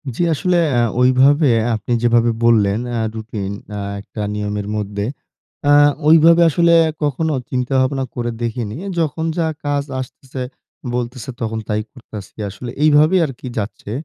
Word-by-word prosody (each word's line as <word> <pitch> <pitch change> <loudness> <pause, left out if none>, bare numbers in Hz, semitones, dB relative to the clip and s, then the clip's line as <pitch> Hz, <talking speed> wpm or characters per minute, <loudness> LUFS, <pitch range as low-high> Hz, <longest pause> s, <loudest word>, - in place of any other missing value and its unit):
জি, - - -3
আসলে 180 +3 +1
অ্যা 120 -2 +2 0.2
ওইভাবে 135 +4 +4 0.3
আপনি 110 +3 -3
যেভাবে 120 0 +3
বললেন 105 -3 +3
অ্যা 115 -1 -1
রুটিন 110 -3 -5 0.2
অ্যা 105 -1 -4 0.2
একটা 105 - -8
নিয়মের 105 -1 -3
মধ্যে 100 -1 -3 0.6
অ্যা 145 - +5 0.3
ঐভাবে 165 +2 +6
আসলে 170 +2 +3 0.3
কখনো 150 +2 0 0.2
চিন্তাভাবনা 130 +1 0
করে 120 -1 -2
দেখিনি। 115 -2 -3 0.2
যখন 160 0 -1
যা 165 -2 +1 0.2
কাজ 145 -1 0 0.2
আসতেছে, 130 +1 -9 0.5
বলতেছে 125 +1 -4
তখন 110 -1 -2
তাই 105 0 0
করতেছি। 110 -7 -11
আসলে 120 +5 -8
এইভাবেই 155 +4 +5
আরকি 135 -2 -8
যাচ্ছে। 105 -1 -5
125 Hz, 135 wpm, -18 LUFS, 110-145 Hz, 0.6 s, ঐভাবে